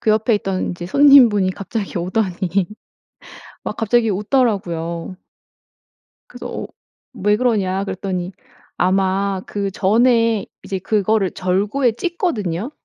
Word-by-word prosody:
그 215 - +1
옆에 220 +1 +2
있던 195 -2 -2
이제 175 0 -6
손님분이 240 -6 +6
갑자기 200 0 -4
오더니 185 0 -1 1.0
막 - - -4
갑자기 225 0 +2
웃더라고요. 185 -6 -1 1.1
그래서 - - -8
어 - - -6 0.5
"왜 210 +2 +1
그러냐." 200 -6 0
그랬더니 185 -1 -4 0.5
아마 190 +1 +1
그 200 -1 -3
전에 230 +2 +2 0.2
이제 190 - -3
그거를 210 -1 +1
절구에 205 +7 0
찧거든요. 240 - -2
200 Hz, 255 characters per minute, -19 LUFS, 185-225 Hz, 1.1 s, 손님분이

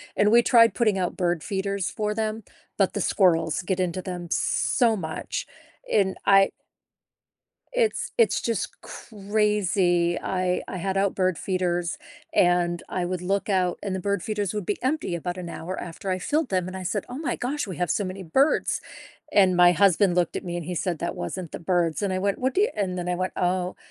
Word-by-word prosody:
and 210 +1 +3
we 235 +1 +7
tried 230 -4 +5
putting 215 -5 +2
out 180 -2 -2
bird 175 -3 0
feeders 195 -1 -2
for 210 0 -2
them, 220 0 -2 0.3
but 195 -2 +2
the 205 - -2
squirrels 165 -5 +2
get 185 0 -1
into 180 +1 -1
them 175 -2 -6
so 230 -3 +2
much, 160 -5 -4 0.5
and 190 -2 +2
I 195 -1 +6 1.2
it's 485 -3 0
it's 465 -2 +3
just 230 -1 -3
crazy. 200 -5 0
I 185 -1 0
I - - -5
had 195 +2 -2
out 195 0 +1
bird 185 -2 +1
feeders 175 -2 -1 0.4
and 175 -1 +3
I 180 -1 -2
would 180 0 -3
look 195 +3 -1
out 185 -3 +1
and 195 -2 -2
the 190 - -2
bird 200 -1 -1
feeders 210 -3 -2
would 210 - -3
be 205 - -1
empty 265 - -1
about 175 +1 -4
an 180 -2 -6
hour 180 +3 -5
after 180 +3 -6
I 185 - 0
filled 305 - 0
them, 185 -1 0
and 190 - -6
I 185 - -6
said, 195 +2 -2
"Oh 250 +3 -6
my 310 - -2
gosh, 275 +1 -2
we 185 - -6
have 180 -2 -1
so 205 - +1
many 185 +1 -5
birds." 265 - +2 0.5
And 185 -3 +5
my 175 0 +7
husband 185 0 +4
looked 175 -1 +1
at - - -4
me 175 -1 -4
and 175 - -4
he 180 +2 -4
said, 175 -1 -2
"That - - -3
wasn't 160 - -5
the - - -5
birds," 175 0 0
and 195 -2 0
I 185 - 0
went, 200 +1 0
"What 260 +1 0
do 400 - +3
you" - - +2
and 185 -3 -1
then 180 0 -3
I 180 - +1
went, 185 +1 -2
"Oh, 180 0 0
185 Hz, 210 wpm, -25 LUFS, 175-205 Hz, 1.2 s, we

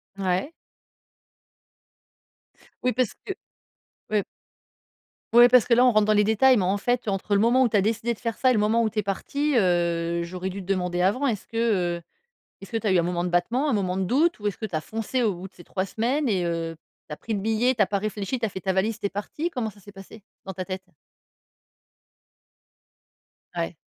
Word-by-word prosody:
Ouais. 190 - -1 2.3
Oui, 250 - +2
parce 250 -1 +1
que. 390 - -3 0.8
Ouais 210 -2 +1 1.1
ouais, 240 +1 +8
parce 250 -1 +6
que 240 - +2
là, 245 +2 +5
on 250 - +6
rentre 215 -2 +3
dans 215 - +3
les 210 - +4
détails. 220 +5 +4
Mais, 195 - +1
en 190 +3 +1
fait, 245 +3 -1
entre 200 +1 -1
le 200 - +3
moment 245 +3 +4
où 240 - +2
tu - - -2
as 200 - +5
décidé 225 +3 0
de 220 - -14
faire 230 -2 -3
ça 260 - +3
et 255 - +4
le 215 - +2
moment 215 +3 +2
où 220 - +1
tu 215 0 -3
es 210 - 0
parti, 280 +9 -1
heu, 170 -3 +1
j'aurais 180 +2 -5
dû 195 +1 -6
te - - -11
demander 180 -2 -1
avant. 230 +10 +2
Est-ce 215 -6 -2
que, 205 -7 0
heu, 170 - -11 0.6
est - - -8
ce - - -18
que 230 - 0
tu 220 - -3
as - - +3
eu 185 - +4
un - - +4
moment 175 0 -1
de - - -1
battement, 235 +12 +1
un - - +1
moment 190 -3 0
de 190 - 0
doute? 295 - +2
Ou 210 - -2
est-ce 205 - -3
que 220 - -4
tu 185 -6 -5
as 155 - -1
foncé 225 +7 -3
au 215 -5 +2
bout 180 +2 -8
de - - -38
ces 175 - -14
3 190 0 -2
semaines 250 +7 -1
et 185 -4 +1
heu, 165 -1 -2 0.3
tu - - -5
as - - -7
pris 225 - -5
le 205 - -1
billet, 225 +5 +1
tu 225 - +1
as - - +6
pas 200 - 0
réfléchi, 210 +4 -3
tu 230 - 0
as - - -2
fait 190 - -7
ta 190 - 0
valise, 205 +4 0
tu - - -5
es - - -9
parti? 210 - -4
Comment 250 -9 -3
ça 205 -1 -17
s'est 205 - -13
passé 195 +2 -13 0.2
dans 190 - -5
ta 185 - -4
tête? 185 0 -6 2.7
Ouais. 170 -1 -3
210 Hz, 240 wpm, -25 LUFS, 185-235 Hz, 2.7 s, ouais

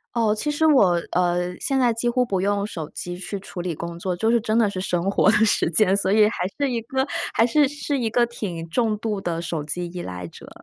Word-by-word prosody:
哦， 225 -3 +2
其 215 +8 -3
实 295 +2 +1
我， 200 - +5
呃， 180 0 0
现 270 -1 0
在 245 -2 +3
几 230 +2 -1
乎 250 +1 +1
不 195 -5 -1
用 200 +1 0
手 160 -7 -6
机 175 0 -6
去 195 +2 -5
处 190 -1 -7
理 175 -2 -3
工 170 +2 -6
作， 180 0 -2
就 220 +6 +1
是 235 -1 +3
真 215 +1 0
的 230 -2 +4
是 185 -2 -4
生 180 0 -1
活 200 - +4
的 - - +3
时 205 - +2
间， 190 +3 +3
所 195 -1 0
以 210 0 +5
还 185 -4 -2
是 285 -1 +1
一 235 -2 -1
个 265 +4 -1 0.3
还 225 - +4
是 285 +4 +3
是 290 0 -3
一 230 - 0
个 240 +2 +3
挺 185 -8 -6
重 220 +2 0
度 210 -2 -3
的 170 -3 -2
手 165 -3 -3
机 175 +4 -4
依 175 +1 -6
赖 90 - -6
者。 - - -13
205 Hz, 270 characters per minute, -23 LUFS, 175-235 Hz, 0.3 s, 我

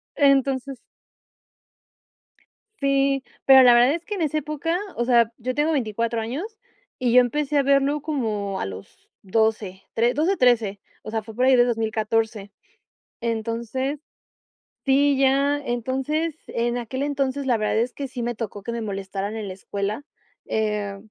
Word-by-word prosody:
Entonces 275 -1 +2 2.0
Sí, 275 -1 +2 0.2
pero 265 -1 +9
la 245 -1 +8
verdad 245 +4 +5
es 340 0 -8
que 420 - -5
en 370 - -4
esa 310 -1 0
época, 305 +3 -2 0.2
o 240 - +1
sea, 235 -2 +4
yo 255 +3 -3
tengo 300 +2 +2
24 230 -3 -1
años, 350 - -5 0.4
y 245 -2 +1
yo 250 +1 +8
empecé 295 +4 0
a 280 - +4
verlo 280 +2 +2
como 215 -10 -2
a - - -2
los 95 0 -11
12, 210 -2 0
tre 235 +2 +2
12, 340 +7 +1
13, 225 -5 +2 0.2
o - - -8
sea, 220 -1 -2
fue 225 - -10
por 250 +1 +2
ahí 260 -1 +6
de 245 - +5
2014. 220 -2 -1 0.7
Entonces 235 +5 -2 0.9
sí, 280 +1 +4
ya, 275 +2 +3
entonces, 270 +5 -2
en 240 +1 -1
aquel 250 +3 -4
entonces, 280 -1 -1
la 245 -3 +2
verdad 215 0 0
es 240 +2 -1
que 280 - -5
sí 250 -2 -5
me 240 0 -2
tocó 210 -3 -6
que 235 - -4
me 235 0 -3
molestaran 195 0 -4
en 215 -2 -5
la - - -5
escuela. 200 +5 -4 0.4
Eh, 210 -2 -2
245 Hz, 160 wpm, -23 LUFS, 220-275 Hz, 2.0 s, pero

